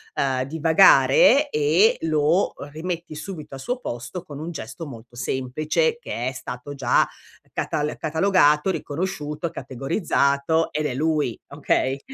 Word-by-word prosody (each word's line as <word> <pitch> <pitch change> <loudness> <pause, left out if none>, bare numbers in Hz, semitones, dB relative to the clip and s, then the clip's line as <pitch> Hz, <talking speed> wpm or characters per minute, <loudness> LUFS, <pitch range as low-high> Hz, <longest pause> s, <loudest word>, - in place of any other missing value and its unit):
uhm, 130 -2 0
divagare 160 - +5
e 160 - +3
lo 160 +3 +2 0.2
rimetti 165 0 -5
subito 155 -3 -7
al 135 - -9
suo 250 - -3
posto 120 - -6
con 145 -5 -10
un 165 +2 -5
gesto 140 +3 -7
molto 120 -2 -11
semplice 150 - -1
che 125 - -4
è 130 - -1
stato 125 +3 -7
già 130 -3 +2 0.5
catal 150 +1 -2
catalogato, 160 -1 +3
riconosciuto, 165 -1 -3
categorizzato 140 - 0
ed 150 0 -2
è 130 - -1
lui, 150 -3 0
okay? 140 -1 0
150 Hz, 130 wpm, -23 LUFS, 135-170 Hz, 0.5 s, divagare